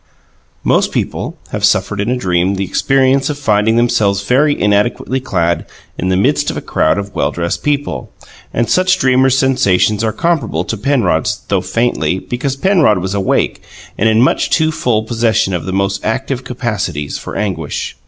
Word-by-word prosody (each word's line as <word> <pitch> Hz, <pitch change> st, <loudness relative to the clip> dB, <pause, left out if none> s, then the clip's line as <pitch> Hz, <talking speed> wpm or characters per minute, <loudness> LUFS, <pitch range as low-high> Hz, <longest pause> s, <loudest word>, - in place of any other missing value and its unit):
Most -, -, +2 dB
people -, -, -3 dB
have -, -, -4 dB
suffered 105 Hz, -1 st, +2 dB
in 105 Hz, -, -2 dB
a 125 Hz, -, 0 dB
dream 90 Hz, -3 st, 0 dB
the 95 Hz, -, -2 dB
experience 135 Hz, +5 st, +2 dB
of 150 Hz, -, -3 dB
finding 110 Hz, -4 st, +2 dB
themselves 105 Hz, -4 st, +2 dB
very 145 Hz, +7 st, +2 dB
inadequately 105 Hz, +5 st, +1 dB
clad 85 Hz, -, -1 dB, 0.3 s
in 90 Hz, -, -2 dB
the 95 Hz, -, +2 dB
midst 100 Hz, -, +1 dB
of -, -, -4 dB
a -, -, -4 dB
crowd 80 Hz, -, +1 dB
of 100 Hz, 0 st, -5 dB
well 70 Hz, -, 0 dB
dressed 85 Hz, 0 st, -3 dB
people, 145 Hz, -1 st, -2 dB, 0.4 s
and 120 Hz, 0 st, 0 dB
such 185 Hz, -, +3 dB
dreamers' 130 Hz, -3 st, +3 dB
sensations 110 Hz, -6 st, +2 dB
are 110 Hz, -, +1 dB
comparable 150 Hz, -, -1 dB
to 110 Hz, -, -3 dB
Penrod's, 105 Hz, -, 0 dB
though -, -, +1 dB
faintly, 105 Hz, -8 st, 0 dB
because 125 Hz, +7 st, -3 dB
Penrod 155 Hz, -, +3 dB
was 95 Hz, +2 st, -3 dB
awake 100 Hz, -2 st, 0 dB, 0.3 s
and 110 Hz, -, +2 dB
in 110 Hz, +1 st, +3 dB
much 130 Hz, -, +2 dB
too 160 Hz, 0 st, +2 dB
full 115 Hz, -7 st, 0 dB
possession 110 Hz, -4 st, 0 dB
of 85 Hz, -, -3 dB
the 95 Hz, -, -3 dB
most 100 Hz, +1 st, -1 dB
active 130 Hz, +2 st, -2 dB
capacities 100 Hz, -, -3 dB
for -, -, -8 dB
anguish. 90 Hz, -8 st, -3 dB
110 Hz, 175 wpm, -15 LUFS, 95-130 Hz, 0.4 s, such